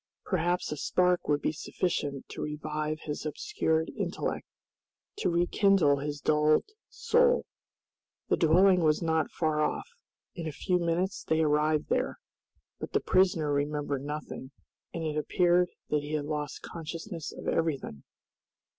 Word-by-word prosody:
Perhaps 175 -1 0
a 150 - -3
spark 180 +3 +1
would 145 -1 +1
be - - +2
sufficient 150 -4 -2
to - - -7
revive 150 0 -3
his 150 -1 -4
obscured 160 - -1
intellect, - - -3 0.7
to - - +1
rekindle 175 -3 +3
his 145 +1 -4
dulled 150 +1 +3 0.2
soul. 485 0 +3 0.8
The - - +3
dwelling 180 +3 +5
was 155 +1 +3
not 160 -1 +1
far 155 -2 0
off. - - -1 0.5
In 170 -4 -5
a - - -2
few 180 +5 0
minutes 175 +3 -1
they 160 0 +1
arrived 150 0 +2
there, - - 0 0.6
but - - -6
the - - +4
prisoner 175 -6 +2
remembered 145 -1 -1
nothing, 145 -2 -6 0.4
and 165 - -4
it 155 -1 -2
appeared 175 +3 +3 0.2
that 150 -1 +2
he 145 +1 -6
had 150 -2 -1
lost 150 -1 -4
consciousness 165 +1 -6
of - - -9
everything. 145 - -1
155 Hz, 140 wpm, -29 LUFS, 150-175 Hz, 0.8 s, dwelling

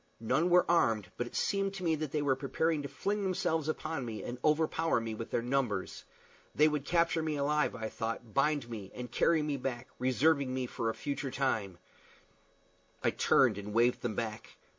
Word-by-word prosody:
None 130 +10 +1
were 180 0 +5
armed; 110 - +2
but 120 - -3
it - - -11
seemed 195 0 0
to 190 - -6
me 165 -2 +2
that 155 -2 -3
they 150 -1 0
were 135 -2 +2
preparing 145 +4 0
to 140 - -4
fling 200 +9 -2
themselves 165 -5 0
upon 155 -2 -3
me 110 -3 -5
and 125 +1 -5
overpower 160 -1 +2
me 115 -1 -4
with 115 +1 -6
their 115 - -1
numbers. 120 -7 -1 0.5
They 150 - +6
would 150 -2 -1
capture 170 0 +2
me 155 -1 -1
alive, 150 +1 +1
I 110 - -4
thought, 115 0 -5
bind 145 -2 +2
me, 105 -5 -7
and 125 -1 -6
carry 160 +3 +3
me 150 -2 -1
back, 125 -1 -4
reserving 135 +2 +2
me 130 -1 -1
for 115 -2 -2
a 110 - -3
future 140 -1 -3
time! 110 -9 -1 1.3
I - - +3
turned 115 -6 +3
and 105 +1 -7
waved 120 +1 +3
them 115 -4 -2
back. 110 -1 -5
135 Hz, 195 wpm, -32 LUFS, 115-155 Hz, 1.3 s, They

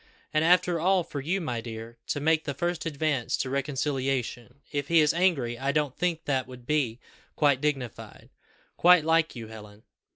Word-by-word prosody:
And 155 0 +3
after 175 0 +3
all, 185 +2 +3
for 145 - -6
you, 175 +8 -1
my 125 -9 -3
dear, 115 0 -8
to - - -1
make 160 +2 +2
the 140 - -3
first 175 -1 -2
advance 145 -5 -1
to 130 - -3
reconciliation! 135 -2 -2
If 145 -1 -2
he 165 +1 +4
is 150 -1 +4
angry 155 -10 +1
I 135 +1 0
don't 145 -2 0
think 170 -2 -1
that 135 -3 0
would 125 -1 -12
be 130 -5 0 0.4
quite 140 -3 +3
dignified; 135 -6 -4 0.5
quite 175 -2 +6
like 165 -1 +2
you, 115 -2 -8
Helen." 105 -1 -12
145 Hz, 175 wpm, -27 LUFS, 125-160 Hz, 0.5 s, quite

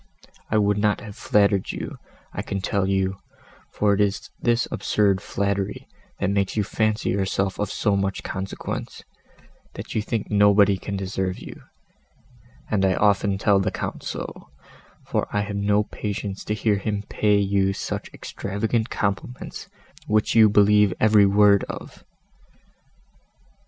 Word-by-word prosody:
I 110 - +2
would 105 -1 +2
not 105 0 +2
have 105 -3 -9
flattered 100 -2 +2
you, - - -6 0.3
I - - -3
can 100 - -4
tell 95 0 0
you, 95 0 0 0.5
for 105 -1 +2
it 100 - +1
is 100 -1 -1
this 120 0 +2
absurd 100 -2 +1
flattery 100 0 -2 0.3
that 100 0 0
makes 100 +1 0
you 105 - +2
fancy 110 +2 0
yourself 95 0 -1
of 105 - -1
so 105 - +1
much 95 -1 -1
consequence, 95 +1 -5 0.7
that - - -7
you 110 - 0
think 110 0 -3
nobody 100 -1 +5
can 100 +1 -4
deserve 95 -1 -2
you, - - -11 1.1
and 100 -3 +2
I 95 -1 +3
often 100 -1 +2
tell 100 0 +3
the 95 - 0
Count - - -5
so, - - -7 0.6
for - - -1
I 105 - +1
have 100 0 -4
no 100 +1 +2
patience 100 -1 -5
to 105 - -1
hear 105 -2 +1
him 105 0 -2
pay 105 -1 +2
you 100 -1 +2
such - - -4
extravagant 110 +3 -3
compliments, 100 +5 -4 0.4
which 105 0 +2
you 110 -2 +7
believe 105 -1 +4
every 105 -2 +5
word 100 0 +5
of!" - - -9
100 Hz, 145 wpm, -23 LUFS, 100-105 Hz, 1.1 s, you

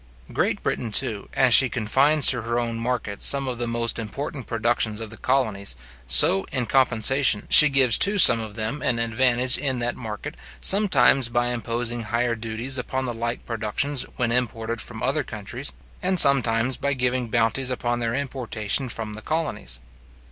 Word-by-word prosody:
Great - - -2
Britain, 115 - -3
too, 110 -3 -1
as 125 -3 +3
she 130 +3 +7
confines 135 +6 +1
to 125 -2 +5
her 120 +1 -3
own 115 -1 -4
market 115 -4 -4
some 140 -1 +3
of 125 -2 -5
the 120 - -3
most 115 0 -1
important 135 +4 -7
productions 115 -1 -1
of 110 -1 -8
the 110 - -11
colonies, 110 -7 -2 0.3
so, 95 +9 +5
in 125 -2 -2
compensation, 130 -2 +2
she 150 - +9
gives 135 -4 +3
to 205 +1 +4
some 120 -11 +7
of 110 -2 -8
them 115 +6 -5
an 120 - -1
advantage 125 +2 +1
in 135 -3 -2
that 120 0 -3
market, 110 -4 -8 0.3
sometimes 190 - +3
by 120 +1 -1
imposing 120 0 -3
higher 120 +2 -2
duties 115 +4 -3
upon 130 +1 -4
the 120 - -4
like 115 +1 -5
productions 120 +5 -2
when 120 -2 -2
imported 115 -1 -2
from 110 -2 -7
other 140 +4 -1
countries, 120 +4 -7 0.3
and 185 0 -1
sometimes 125 -3 +4
by 140 0 -2
giving 125 -1 -2
bounties 115 +3 0
upon 120 -1 -3
their 115 0 -3
importation 130 -3 -3
from 110 -2 -4
the 110 - -8
colonies. 110 - -4
120 Hz, 170 wpm, -22 LUFS, 115-130 Hz, 0.3 s, she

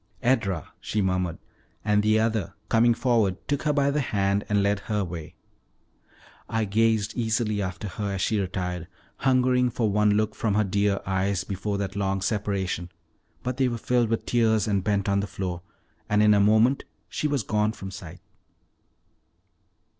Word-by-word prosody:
"Edra," 110 - 0
she 105 - -2
murmured; 90 -3 0 0.5
and 105 -1 +3
the 110 +1 +3
other, 110 -5 -1
coming 115 +1 +4
forward, 110 -8 +2
took 145 -1 0
her 150 - +1
by 140 -1 +2
the 150 +1 +1
hand 100 -4 0
and 105 -1 +2
led 100 0 +1
her 105 +1 -3
away. 85 -4 -6 1.1
I 115 -1 0
gazed 110 0 +1
eagerly 110 -3 0
after 95 +2 -4
her 100 +1 -3
as 95 - -3
she 110 +3 +1
retired, 90 -3 -3 0.3
hungering 125 -1 +3
for 115 -2 0
one 105 +1 +3
look 110 0 +1
from 105 -2 -1
her 105 - +3
dear 100 0 +1
eyes 95 0 0
before 100 +2 -3
that 100 -1 -3
long 95 -1 0
separation; 95 -4 -2 0.5
but 125 0 -3
they 135 -1 +3
were 120 -1 -2
filled 120 -1 +1
with 115 - -1
tears 110 -2 +2
and 100 -3 +1
bent 100 -1 0
on 100 0 +2
the 100 - -2
floor, 90 -3 -4 0.5
and 105 0 +3
in 105 0 +6
a 100 - +4
moment 110 +6 +4 0.2
she 150 - -2
was 145 -5 0
gone 105 0 +1
from 95 -3 -8
sight. 90 -2 -10
105 Hz, 170 wpm, -26 LUFS, 95-115 Hz, 1.1 s, in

